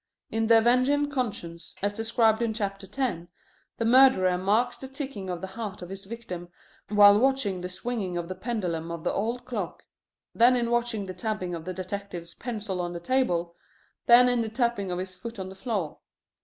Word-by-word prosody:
In 225 0 0
The 230 0 +7
Avenging 255 +5 +3
Conscience, 200 -11 -4
as 205 0 +1
described 225 0 +2
in 225 -2 0
chapter 195 -2 -3
ten, 210 -11 -2 0.5
the 230 - -1
murderer 230 -7 +6
marks 215 +7 +1
the 265 - -7
ticking 265 -8 -6
of 175 -1 -4
the - - -3
heart 215 -5 -6
of 175 - -9
his 195 +1 -6
victim 190 -6 -7 0.4
while 205 0 +7
watching 245 -8 +1
the 180 - -4
swinging 190 -1 -3
of 170 -1 -3
the 185 - -4
pendulum 180 -6 -3
of 170 -1 -6
the - - 0
old 230 +5 -2
clock, 210 -9 -5 0.5
then 245 +2 +5
in 235 -1 0
watching 240 -3 0
the 185 - -6
tapping 185 -1 -3
of 165 -1 -6
the 185 - -4
detective's 185 -2 -5
pencil 215 -6 -3
on 175 0 -3
the 170 - -5
table, 175 -6 0 0.5
then 245 +1 +8
in 245 -1 +3
the 225 - -2
tapping 235 -4 0
of 180 - -2
his 185 0 -4
foot 230 +5 -8
on 190 -1 -5
the - - -9
floor. 195 -6 -3
205 Hz, 195 wpm, -27 LUFS, 185-235 Hz, 0.5 s, then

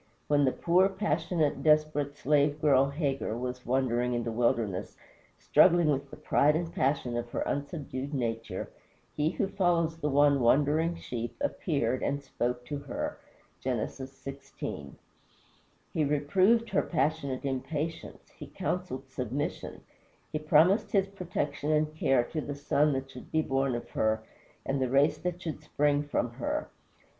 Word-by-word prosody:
When 145 -1 +4
the 130 - +3
poor, 180 +6 +3
passionate, 170 -5 0
desperate 150 -2 +2
slave 145 +1 +2
girl 140 -2 +4
Hagar 140 -6 -2
was 125 0 -5
wandering 125 -1 +1
in 120 - -1
the 115 - -3
wilderness, 110 -5 0 0.4
struggling 175 -3 +5
with 140 0 -2
the - - -10
pride 150 +2 +3
and 165 +1 -2
passion 130 -3 0
of 120 0 -3
her - - -3
unsubdued 140 -2 -4
nature, 115 -7 -3 0.4
he 150 +1 +1
who 195 +3 -1
follows 175 -4 +1
the 150 -2 -1
one 140 0 +4
wandering 150 +7 +3
sheep 120 -7 -5
appeared 140 - -1
and 140 0 -1
spoke 125 -2 -2
to 145 +3 -4
her - - -4 0.4
(Gen. 125 -2 -1
xvi.). 135 - -6 1.0
He 155 - +1
reproved 185 +11 +2
her - - +3
passionate 140 -4 -1
impatience; 145 +4 -4
he - - -10
counseled 140 -8 -3
submission; 130 +2 -4 0.5
he 155 - -1
promised 160 +7 +4
his 195 -1 +3
protection 155 -6 -3
and 155 0 +1
care 135 -5 +2
to 155 +5 -4
the 145 -1 -5
son 145 +1 +2
that 135 0 -4
should 125 - -11
be 160 0 +2
born 135 -2 0
of 120 - -6
her 110 0 +1 0.4
and 135 0 -1
the 130 - +1
race 140 +3 +3
that 180 0 -4
should 155 -3 -4
spring 145 -1 +1
from 145 -4 -1
her. 120 +1 -3
145 Hz, 150 wpm, -29 LUFS, 130-155 Hz, 1.0 s, struggling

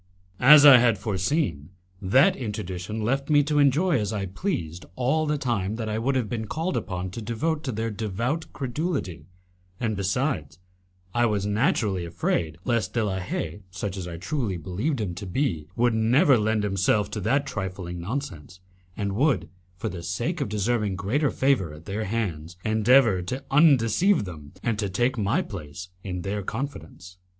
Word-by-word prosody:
As 145 +3 +9
I 135 -4 +10
had 120 -3 +3
foreseen, 95 - -1 0.3
that 135 - +4
interdiction 105 -2 -4
left 135 +6 -1
me 145 -1 +5
to 150 +1 +1
enjoy 145 +3 +3
as 105 -1 -2
I 100 -3 -2
pleased 90 - -3
all 150 +5 +1
the 150 0 +1
time 110 -7 -1
that 110 -1 -4
I 110 0 -1
would 135 +4 0
have 125 -4 0
been 110 -1 -4
called 165 - -2
upon 90 -1 -3
to 115 - -6
devote 150 +8 -2
to 130 - -1
their 115 0 -2
devout 115 - -3
credulity, 125 - -3 0.5
and 110 -3 -1
besides, 95 - -1 0.6
I 120 0 +3
was 105 -2 -1
naturally 105 -3 +1
afraid 85 -2 -1
lest 115 -5 0
De 115 - +2
la 95 -2 -2
Haye, 90 0 -4
such 95 +1 -4
as 95 -3 -5
I 85 -1 -6
truly 110 - -2
believed 105 - -2
him 100 -5 -2
to 95 +3 -7
be, 90 - -1
would 120 0 +2
never 120 +5 +4
lend 110 -1 +1
himself 100 +1 +1
to 105 - -3
that 135 +8 +1
trifling 95 -6 -5
nonsense, 90 - -5 0.4
and 100 -1 -2
would, 115 - +1 0.3
for - - -3
the 90 -2 -7
sake 120 - -2
of 140 - -1
deserving 105 -1 0
greater 120 +10 0
favour 130 - +1
at 80 +2 -14
their 105 +3 -3
hands, 90 -6 -3
endeavour 110 -2 +4
to 125 +10 -5
undeceive 145 - +4
them 75 -5 -10
and 115 -3 -1
to 100 -3 -1
take 120 +8 +1
my 105 -4 +1
place 80 +4 -8
in 90 -2 -4
their 100 +1 -2
confidence. 90 - -6
110 Hz, 175 wpm, -25 LUFS, 95-130 Hz, 0.6 s, I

